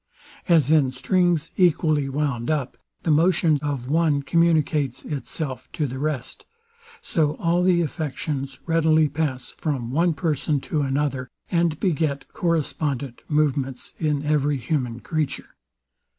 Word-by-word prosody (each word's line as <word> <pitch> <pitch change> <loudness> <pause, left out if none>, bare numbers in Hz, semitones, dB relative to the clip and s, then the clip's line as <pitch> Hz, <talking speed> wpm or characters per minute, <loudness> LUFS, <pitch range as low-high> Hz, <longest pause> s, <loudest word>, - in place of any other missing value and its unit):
As 160 -5 +4
in 145 -5 +4
strings 165 +4 +1
equally 155 -5 +3
wound 135 -4 -1
up, 150 -5 -1 0.3
the 165 - +2
motion 160 -1 +3
of 140 -4 -3
one 150 -1 +2
communicates 155 -5 +1
itself 145 -1 -5
to 150 - -1
the 130 -1 -5
rest; 145 -4 -3 0.6
so 150 -3 +1
all 170 +1 +1
the 180 -1 +4
affections 145 -3 -3
readily 160 -2 +3
pass 145 -3 -3
from 130 -7 -2
one 165 +3 +2
person 150 -2 0
to 150 +1 -1
another, 135 -1 -1 0.2
and 170 -3 +1
beget 155 -6 0
correspondent 145 -6 -2
movements 140 -4 0
in 150 -2 0
every 145 -1 +2
human 125 -2 -2
creature. 155 -3 -3
150 Hz, 125 wpm, -24 LUFS, 135-160 Hz, 0.6 s, As